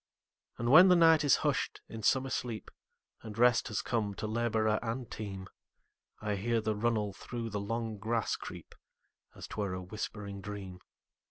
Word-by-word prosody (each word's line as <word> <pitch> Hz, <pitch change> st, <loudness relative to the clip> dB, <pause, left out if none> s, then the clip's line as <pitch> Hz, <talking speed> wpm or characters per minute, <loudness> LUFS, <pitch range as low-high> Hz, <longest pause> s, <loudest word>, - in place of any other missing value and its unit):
And 120 Hz, +1 st, 0 dB
when 180 Hz, +6 st, +10 dB
the 180 Hz, -, +7 dB
night 165 Hz, -2 st, +6 dB
is 145 Hz, -, +5 dB
hush'd -, -, 0 dB
in 115 Hz, -, -7 dB
summer 130 Hz, +4 st, +2 dB
sleep, 115 Hz, -3 st, -4 dB, 0.5 s
And 110 Hz, -1 st, -9 dB
rest 120 Hz, 0 st, +4 dB
has 110 Hz, +1 st, -2 dB
come 105 Hz, -5 st, -1 dB
to 110 Hz, -, -4 dB
laborer 110 Hz, -1 st, +1 dB
and 115 Hz, +1 st, -4 dB
team,I 100 Hz, +1 st, -8 dB
hear 115 Hz, +3 st, +1 dB
the 110 Hz, -1 st, -1 dB
runnel 105 Hz, -2 st, 0 dB
through 115 Hz, +2 st, -6 dB
the 100 Hz, 0 st, -2 dB
long 110 Hz, 0 st, -3 dB
grass 115 Hz, +1 st, 0 dB
creep, -, -, -9 dB, 0.6 s
As -, -, -8 dB
't -, -, -9 dB
were 95 Hz, -2 st, -2 dB
a 95 Hz, -, -5 dB
whispering 100 Hz, 0 st, -6 dB
dream. 95 Hz, -2 st, -7 dB
110 Hz, 165 wpm, -32 LUFS, 105-120 Hz, 0.6 s, when